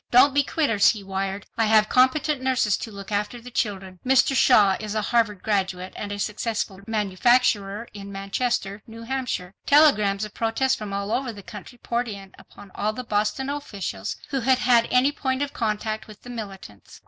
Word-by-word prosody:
"Don't 255 +3 +6
be 285 - +4
quitters," 275 -8 +3
he 210 -3 -9
wired, 195 0 -3
"I 225 - +4
have 215 0 +5
competent 260 +3 +2
nurses 255 -6 +2
to - - -6
look 200 0 -9
after 210 +4 -2
the 245 +1 -11
children." 190 -5 -3
Mr. 265 +1 +3
Shaw 200 -5 +5
is 215 0 -5
a 215 - +1
Harvard 220 -4 +1
graduate 190 -3 -1
and 205 - -5
a 205 - -4
successful 210 -1 -3
manufacturer 210 0 +1
in 200 -1 -9
Manchester, 200 +1 -2
New 230 0 -10
Hampshire. 235 -7 -3
Telegrams 215 -9 +4
of 210 - -11
protest 235 +4 0
from 210 -2 -6
all 200 +1 -3
over 255 +1 -1
the 205 -3 -11
country 210 +5 -10
poured 240 +1 -2
in 195 -3 -8
upon 200 -1 -15
all 215 +1 -1
the 255 - -6
Boston 215 +4 -1
officials 200 - -4
who 275 -2 -1
had 260 +1 +3
had 240 -2 +3
any 255 +3 +4
point 265 -1 -1
of 285 - -5
contact 215 0 -2
with 215 -1 -14
the 245 - -9
militants. 195 - -9
215 Hz, 185 wpm, -24 LUFS, 200-250 Hz, -, Don't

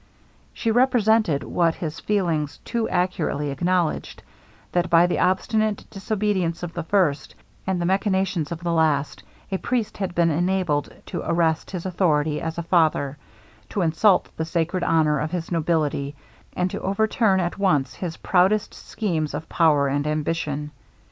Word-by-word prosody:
She 230 - -1
represented, 220 - +3
what 170 -2 +1
his 160 -2 -5
feelings 170 -8 -1
too 230 -2 -1
acutely 175 -5 -1
acknowledged, 175 +3 -1 0.5
that 175 0 0
by 170 +1 +6
the 175 - 0
obstinate 210 +3 +1
disobedience 195 -4 -1
of 175 -1 -5
the 170 - -3
first, 165 -4 0 0.3
and 190 -2 0
the 175 - -1
machinations 190 -4 0
of 170 0 -5
the 170 -1 0
last, 155 -3 +1 0.3
a 190 - -1
priest 240 -4 -2
had 190 -3 -3
been 170 -1 +3
enabled 175 -2 0
to 175 - -4
arrest 165 -1 +1
his 180 -2 -5
authority 155 -5 +1
as 160 0 -4
a 170 - -2
father 155 -4 +1 0.5
to 195 - -1
insult 175 +5 +3
the 160 - -2
sacred 170 +2 -1
honor 155 -3 +2
of 150 - -2
his 175 0 -4
nobility 155 -4 0 0.4
and 180 0 -1
to - - -5
overturn 200 0 +2
at 175 +2 -2
once 145 -10 +2
his 170 -3 -5
proudest 190 +3 +2
schemes 160 -8 -3
of 155 +2 -6
power 150 -4 +3
and 145 +2 -1
ambition. 150 -1 -2
170 Hz, 155 wpm, -23 LUFS, 155-190 Hz, 0.5 s, by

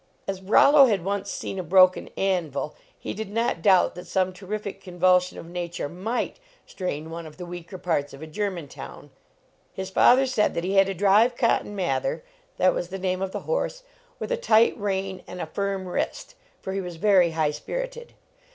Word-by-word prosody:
As 195 -1 -3
Rollo 275 +8 +6
had 200 -7 0
once 200 0 -2
seen 195 - -4
a - - -2
broken 185 +2 +4
anvil, 170 -7 -1 0.2
he - - -5
did 220 0 -5
not 230 -5 -1
doubt 190 0 +4
that 180 0 -10
some 185 0 0
terrific 200 +1 -6
convulsion 180 0 +2
of - - -8
nature 175 -1 -4
might 215 - -3 0.3
strain 160 -4 -5
one 165 0 -6
of 155 - -14
the 180 - -7
weaker 175 +1 -8
parts 155 -5 -1
of 135 - -11
a - - -5
German 175 -1 -3
town. - - -11 0.6
His 190 0 -5
father 255 +7 +5
said 250 -5 +1
that 170 - -1
he 190 +2 -1
had 195 -1 +5
to 195 - -3
drive 205 +6 +4
Cotton 230 -3 +1
Mather 475 - -1 0.3
that 185 - +4
was 175 - -3
the 190 +2 -6
name 185 0 -2
of 195 -1 -2
the - - -4
horse - - -2 0.3
with - - -5
a - - +1
tight 230 - +4
rein 195 -2 -3
and 180 - -8
a - - -2
firm 195 +3 -3
wrist, 180 - -3 0.3
for 190 - -4
he 195 - -1
was 180 -2 -7
very 185 -1 +4
high 155 -2 +2
spirited. - - -6
190 Hz, 195 wpm, -25 LUFS, 175-205 Hz, 0.6 s, Rollo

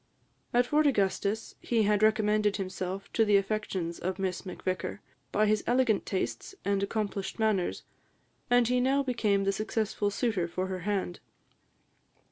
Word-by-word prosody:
At 245 +1 +3
Fort 300 +3 +3
Augustus, 205 -2 0
he 230 -2 +1
had 210 0 +2
recommended 215 -1 +3
himself 190 0 -5
to 225 - +4
the 205 -2 +5
affections 195 -4 -2
of 185 +1 -2
Miss 190 0 -3
Macvicar, 185 +1 -3 0.3
by 215 - +3
his 215 0 +2
elegant 245 -3 +2
tastes 195 - -3
and 200 -1 +1
accomplished 200 -1 -2
manners, 215 -5 0 0.7
and 245 -1 +4
he 250 +1 +2
now 270 +3 +2
became 220 -6 +1
the 195 - +2
successful 215 0 -1
suitor 205 -5 0
for 185 +2 -3
her 185 -1 -4
hand. 190 -3 -1
205 Hz, 145 wpm, -29 LUFS, 195-220 Hz, 0.7 s, the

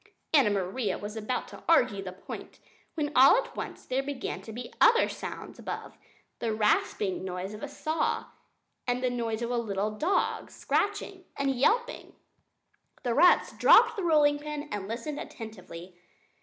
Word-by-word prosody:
Anna 275 -8 +6
Maria 195 +1 -1
was 205 +1 -7
about 220 +3 -3
to - - -11
argue 250 -11 +4
the 190 -1 -6
point 185 - -9 0.4
when 300 -2 -1
all 265 +7 +8
at - - -3
once - - -6
there 260 +1 0
began 275 -1 -5
to 225 - -9
be 240 +2 -8
other 470 +1 +6
sounds - - -7
up - - -11
above - - -6 0.4
the 230 - -1
rasping 210 -3 +1
noise 185 +2 -5
of 210 - -9
a - - -4
saw, 315 +1 -1 0.6
and 250 +1 0
the 250 - +1
noise 230 -2 -2
of 235 - -2
a 245 - 0
little 210 -2 -2
dog, 330 - 0
scratching 400 -2 -2
and 275 -1 +1
yelping! 465 - 0 0.9
The 240 - 0
rats 355 +8 +4
dropped - - +6
the 400 - -3
rolling 295 -3 +4
pin 300 0 -5
and 205 -2 -4
listened 245 +7 -4
attentively. 185 -5 -9
245 Hz, 165 wpm, -28 LUFS, 210-300 Hz, 0.9 s, all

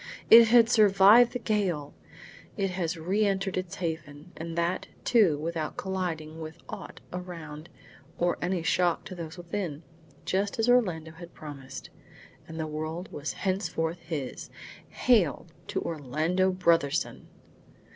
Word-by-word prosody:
It 230 0 +10
had 230 0 +6
survived 215 +1 +6
the - - -1
gale! 190 -11 -1 0.6
It 195 -2 0
has 175 -2 -2
re 190 +7 0
entered 195 -1 0
its 185 0 -3
haven, 160 -2 -5
and 165 +1 -6
that, 170 +2 -1 0.2
too, 205 -11 +4
without 160 0 -4
colliding 165 -5 -3
with 160 0 -7
aught - - -8
around 165 -3 -7 0.5
or 175 0 +1
any 175 -1 -1
shock 175 -1 +1
to - - -7
those 170 -1 -7
within, 170 -3 -4 0.4
just 200 +2 -1
as 225 +1 +1
Orlando 180 -11 +2
had 170 +1 -12
promised; 140 -3 -9 0.6
and 160 0 -8
the 160 - -1
world 155 +3 -5
was 145 +1 -4
henceforth 180 -4 -2
his! 160 -6 -5 0.4
Hail 205 - +2 0.2
to - - -2
Orlando 160 +5 0
Brotherson! 170 -6 +1
175 Hz, 135 wpm, -28 LUFS, 160-195 Hz, 0.6 s, It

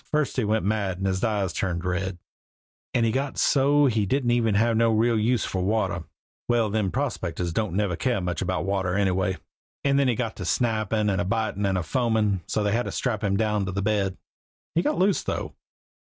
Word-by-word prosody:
First 150 -2 0
he 125 - +2
went 110 0 0
mad 100 -3 0
and 95 - -3
his 95 -1 -1
eyes 105 -6 0
turned 90 -2 -2
red, 90 0 -2 0.7
and 120 -2 +2
he 115 - +2
got 135 +3 -2
so 145 +1 +4
he 110 -6 +1
didn't 120 -3 +1
have 115 +2 +3
no 115 +1 +3
real 115 +1 +2
use 115 +2 +1
for 95 - -2
water 100 -3 0 0.4
well, 115 -3 +2
them 105 -3 0
prospectors 90 - -2
don't 105 -2 -1
never 100 -3 0
care 125 +2 0
much 90 -3 -3
about 95 0 -1
water 95 -2 0
anyway 95 -1 +1 0.5
and 140 0 +3
then 140 - +3
he 120 - +2
got 115 -2 -3
to - - -5
snappin' 110 -3 0
and 95 -2 0
bitin' 110 -3 0
and 90 -3 0
foamin' 110 -3 +1
so's 105 - 0
they 105 - +1
had 120 +3 0
to - - -3
strap 115 -4 -2
him 100 -1 +1
down 105 -1 +1
to - - -2
his 100 +1 -2
bed. 100 -2 0 0.6
He 170 - +2
got - - 0
loose 190 +1 +2
though." - - -4
105 Hz, 205 wpm, -25 LUFS, 95-120 Hz, 0.7 s, so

